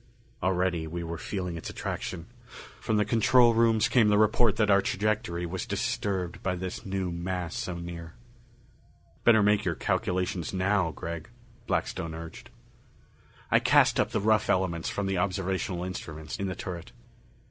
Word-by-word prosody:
Already 90 Hz, -2 st, 0 dB
we 85 Hz, +2 st, -4 dB
were 85 Hz, 0 st, -5 dB
feeling 90 Hz, -4 st, -4 dB
its 80 Hz, -, -6 dB
attraction; -, -, -4 dB, 0.5 s
from 110 Hz, -, 0 dB
the 105 Hz, -, +3 dB
control 115 Hz, +3 st, +5 dB
rooms 115 Hz, -1 st, +4 dB
came 115 Hz, -4 st, +4 dB
the 105 Hz, 0 st, +4 dB
report 110 Hz, +1 st, +4 dB
that 105 Hz, -2 st, +2 dB
our 100 Hz, 0 st, +6 dB
trajectory 100 Hz, -4 st, -1 dB
was 90 Hz, +6 st, -4 dB
disturbed 100 Hz, -5 st, -2 dB
by 90 Hz, -1 st, -1 dB
this 90 Hz, 0 st, -5 dB
new 95 Hz, -2 st, -2 dB
mass 85 Hz, 0 st, -3 dB
so 90 Hz, -, -3 dB
near. 85 Hz, -1 st, -7 dB, 1.1 s
"Better 110 Hz, -3 st, +6 dB
make 105 Hz, +1 st, +3 dB
your 90 Hz, -4 st, -1 dB
calculations 90 Hz, 0 st, -1 dB
now, 95 Hz, -1 st, +2 dB
Gregg," 80 Hz, 0 st, -6 dB, 0.4 s
Blackstone 80 Hz, -1 st, -2 dB
urged. 80 Hz, 0 st, -9 dB, 1.0 s
I -, -, +6 dB
cast -, -, +4 dB
up -, -, +2 dB
the -, -, -1 dB
rough 110 Hz, +1 st, +2 dB
elements 85 Hz, -3 st, +1 dB
from 100 Hz, -, -2 dB
the 95 Hz, -2 st, 0 dB
observational 95 Hz, -2 st, -1 dB
instruments 80 Hz, -4 st, -6 dB
in 100 Hz, -, -2 dB
the 95 Hz, -, -3 dB
turret. 90 Hz, -7 st, -7 dB
95 Hz, 155 wpm, -28 LUFS, 85-105 Hz, 1.1 s, our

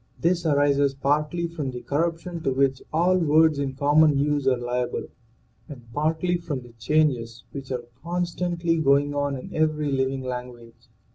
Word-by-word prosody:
This 170 Hz, 0 st, +1 dB
arises 140 Hz, -1 st, +2 dB
partly 150 Hz, +5 st, 0 dB
from 160 Hz, -5 st, -4 dB
the 125 Hz, -1 st, -6 dB
cor 165 Hz, +4 st, 0 dB
ruption 165 Hz, 0 st, -8 dB
to 135 Hz, -, +1 dB
which 135 Hz, 0 st, +1 dB
all 180 Hz, +4 st, +3 dB
words 160 Hz, -2 st, +4 dB
in 135 Hz, -2 st, -2 dB
common 145 Hz, +1 st, +4 dB
use 145 Hz, -1 st, 0 dB
are 130 Hz, -1 st, +3 dB
liable 120 Hz, 0 st, -2 dB, 0.6 s
and 135 Hz, -5 st, -10 dB
partly 160 Hz, +5 st, 0 dB
from 160 Hz, -6 st, -5 dB
the 120 Hz, -1 st, -15 dB
changes 120 Hz, -4 st, 0 dB
which 135 Hz, -2 st, -8 dB
are 125 Hz, -2 st, -3 dB, 0.2 s
constantly 175 Hz, -1 st, -1 dB
going 145 Hz, -1 st, +3 dB
on 145 Hz, -1 st, -1 dB
in 125 Hz, -, -9 dB
every 155 Hz, -2 st, 0 dB
living 135 Hz, 0 st, -1 dB
language. 125 Hz, -2 st, -8 dB
145 Hz, 160 wpm, -25 LUFS, 130-160 Hz, 0.6 s, words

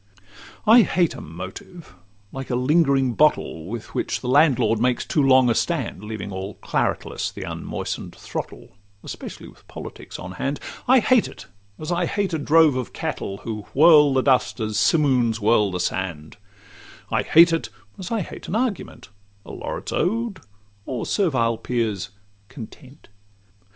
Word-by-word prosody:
I 230 Hz, +2 st, +8 dB
hate 175 Hz, -4 st, +1 dB
a -, -, -9 dB
motive, 95 Hz, -, -10 dB, 0.4 s
like 135 Hz, -1 st, -7 dB
a 125 Hz, -, 0 dB
lingering 135 Hz, -1 st, +2 dB
bottle 130 Hz, -, +1 dB
Which 115 Hz, +2 st, -7 dB
with -, -, -2 dB
the -, -, -5 dB
landlord 130 Hz, -5 st, +3 dB
makes 125 Hz, +1 st, +1 dB
too 150 Hz, -, +1 dB
long 130 Hz, -2 st, +5 dB
a 120 Hz, -, +3 dB
stand, 130 Hz, -, -2 dB
Leaving 105 Hz, -2 st, -6 dB
all 95 Hz, +1 st, -6 dB
claretless -, -, -2 dB
the -, -, -8 dB
unmoisten'd -, -, -5 dB
throttle, -, -, -7 dB, 0.3 s
Especially -, -, -8 dB
with -, -, -18 dB
politics -, -, -9 dB
on 90 Hz, -, -8 dB
hand; 135 Hz, +10 st, -3 dB, 0.3 s
I 255 Hz, 0 st, +6 dB
hate 250 Hz, -2 st, +3 dB
it, -, -, -12 dB, 0.3 s
as 155 Hz, +3 st, -5 dB
I 175 Hz, 0 st, 0 dB
hate 200 Hz, -3 st, -1 dB
a 160 Hz, -, 0 dB
drove 155 Hz, -1 st, +4 dB
of 130 Hz, -2 st, -4 dB
cattle, 95 Hz, -, -4 dB
Who 105 Hz, -2 st, -6 dB
whirl 150 Hz, -2 st, +6 dB
the 130 Hz, -, +2 dB
dust 130 Hz, -2 st, +2 dB
as 110 Hz, -1 st, -2 dB
simooms 125 Hz, -8 st, +2 dB
whirl 105 Hz, -1 st, +3 dB
the 90 Hz, -1 st, -4 dB
sand; 85 Hz, -3 st, -3 dB, 0.7 s
I -, -, +2 dB
hate 170 Hz, +1 st, +6 dB
it, 165 Hz, -, -1 dB, 0.3 s
as 185 Hz, -, -6 dB
I 225 Hz, -2 st, 0 dB
hate -, -, -8 dB
an 195 Hz, -, -3 dB
argument, 225 Hz, -, -3 dB, 0.4 s
A -, -, -9 dB
laureate's -, -, -6 dB
ode, 225 Hz, +2 st, -1 dB, 0.5 s
or 125 Hz, -4 st, -3 dB
servile 125 Hz, -, +1 dB
peer's 110 Hz, -7 st, -2 dB, 0.4 s
'content. 130 Hz, +3 st, -12 dB
130 Hz, 155 wpm, -23 LUFS, 110-165 Hz, 0.7 s, I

